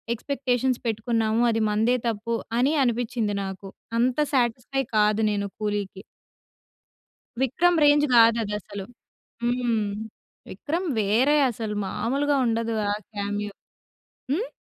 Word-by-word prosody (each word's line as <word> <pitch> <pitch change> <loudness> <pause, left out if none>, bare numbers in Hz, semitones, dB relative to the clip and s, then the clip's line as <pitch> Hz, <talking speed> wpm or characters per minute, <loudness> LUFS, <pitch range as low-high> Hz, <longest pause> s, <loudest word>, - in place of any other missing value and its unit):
Expectations 255 -1 -1
పెట్టుకున్నాము 225 0 0
అది 225 0 +1
మనదే 220 +4 +2
తప్పు 230 +1 -2 0.2
అని 270 +4 +3
అనిపించింది 235 -3 -1
నాకు. 190 0 -7 0.3
అంత 250 +1 +2 0.2
సాటిస్ఫై 250 +1 0
కాదు 210 +1 +3
నేను 200 -1 -1
కూలీకి. 205 -2 -3 1.4
'విక్రమ్' 335 +7 +2
రేంజ్ 290 0 +5
కాదు 230 0 +6
అది 210 -1 -4
అసలు. 200 -2 -8 0.6
హ్మ్. 240 -3 +1 0.7
'విక్రమ్' 340 +4 -3
వేరే 235 +9 +3
అసలు 220 -2 -4
మాములుగా 280 +8 0
ఉండదు 230 0 0 0.2
ఆ - - +1 0.2
కామియో. 205 0 -3 0.8
హ్మ్? 430 +11 -1
230 Hz, 110 wpm, -25 LUFS, 210-255 Hz, 1.4 s, కాదు